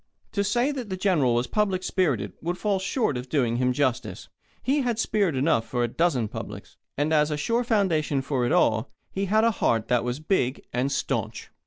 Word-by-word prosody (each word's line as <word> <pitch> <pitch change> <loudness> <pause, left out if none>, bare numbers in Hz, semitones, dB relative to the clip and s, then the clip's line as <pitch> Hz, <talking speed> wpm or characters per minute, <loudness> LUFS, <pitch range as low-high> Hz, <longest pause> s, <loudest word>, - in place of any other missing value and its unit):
To 200 - 0
say 240 +8 +1
that 255 -6 -5
the 185 - -3
General 160 -11 +2
was 120 +1 +1
public 195 - 0
spirited 135 - 0
would 175 +2 -2
fall 200 -2 0
short 190 - 0
of 125 +1 -7
doing 120 -6 +1
him 125 0 +2
justice. 130 -1 -2 0.3
He 280 +3 +2
had 240 -4 -1
spirit 200 -7 +1
enough 130 -4 +1
for 120 -1 -1
a - - +1
dozen 130 -3 +1
publics. - - -8 0.2
And 150 +3 +1
as 150 -1 +3
a 150 - -2
sure 230 +10 0
foundation 165 - +1
for 130 -2 -1
it 120 - 0
all, 110 +3 +2 0.2
he 195 +1 -2
had 215 +3 +3
a 230 - +4
heart 115 - 0
that 125 -1 +2
was 125 +3 -3
big 155 -6 0
and 125 +3 0
stanch. - - -3
155 Hz, 205 wpm, -26 LUFS, 125-200 Hz, 0.3 s, a